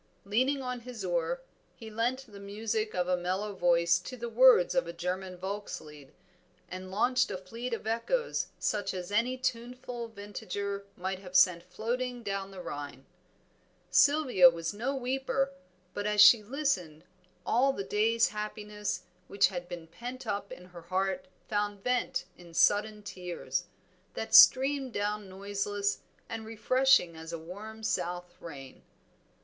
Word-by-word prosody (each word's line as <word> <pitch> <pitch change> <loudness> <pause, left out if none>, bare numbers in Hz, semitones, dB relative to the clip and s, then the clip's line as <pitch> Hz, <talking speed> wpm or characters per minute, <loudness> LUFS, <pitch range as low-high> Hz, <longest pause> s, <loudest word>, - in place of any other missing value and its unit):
Leaning 260 +7 +1
on 250 -1 -3
his 240 -1 -7
oar - - -1 0.3
he 225 -1 -10
lent 245 +5 -1
the 205 -4 -13
music 215 +2 -3
of 180 -1 0
a 180 - +3
mellow 185 +4 -2
voice 170 -1 +3
to 255 +8 -8
the 235 0 -5
words 245 -5 +6
of 265 - +1
a 170 - -5
German 180 +2 -4
Volkslied, 175 -7 -6 0.6
and 185 0 -7
launched 250 +6 +2
a - - -3
fleet 230 +7 -6
of 230 - -4
echoes 235 - 0
such 205 -2 -1
as 180 +1 -5
any 235 +5 +1
tuneful 250 -1 -4
vintager 200 -1 -5
might 190 +1 -3
have 185 -1 -11
sent 180 -2 +6
floating 240 +6 -3
down 195 -1 -3
the 190 -2 -9
Rhine. 145 -2 -7 0.9
Sylvia 280 - +6
was 165 0 -4
no 245 +7 -2
weeper, 270 +1 -1 0.4
but 205 0 -2
as 210 0 0
she 205 +2 +9
listened, 205 - -2 0.4
all 260 +4 +3
the 200 -7 -4
day's 225 +4 +2
happiness 210 0 -4 0.2
which 200 0 +3
had 175 -2 -6
been 170 -2 -7
pent 245 +10 -8
up 200 0 -3
in 180 - -9
her 175 -1 -11
heart 190 +10 -1 0.2
found 205 -2 -2
vent 250 -7 0
in 170 -2 -14
sudden 210 +3 +3
tears, 180 -3 -4 0.5
that - - -5
streamed 270 -1 +7
down 205 -1 -2
noiseless 200 +1 -2 0.3
and 225 - -5
refreshing 225 -4 +3
as 160 +1 -8
a 170 - -3
warm 205 +7 -9
south 180 -2 -2
rain. 135 -5 -10
205 Hz, 150 wpm, -30 LUFS, 180-245 Hz, 0.9 s, she